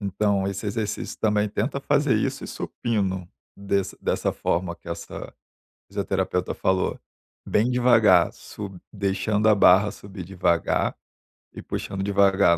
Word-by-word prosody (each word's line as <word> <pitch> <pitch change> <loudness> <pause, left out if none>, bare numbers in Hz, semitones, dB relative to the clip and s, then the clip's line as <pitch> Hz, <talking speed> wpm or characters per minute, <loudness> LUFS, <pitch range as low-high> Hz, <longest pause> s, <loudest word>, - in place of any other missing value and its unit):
Então, 100 0 0
esse 100 +2 -4
exercício 105 0 -3
também, 105 -1 +2
tenta 125 +7 -2
fazer 145 0 +2
isso - - -1
e - - -6
supino, 95 -6 -2 0.3
desse 100 -1 -1
dessa - - 0
forma 85 0 -1
que - - -14
essa 85 0 -7 0.6
fisioterapeuta - - -1
falou. 95 0 0 0.5
Bem 110 +3 +2
devagar, 115 -8 +5
sub 95 -3 -9
deixando 100 +2 0
a 105 - +7
barra 100 +2 +6
subir 100 -2 -9
devagar 90 -2 0 0.6
e - - -8
puxando 95 -1 -4
devagar. 100 -3 +4
100 Hz, 130 wpm, -24 LUFS, 95-105 Hz, 0.6 s, a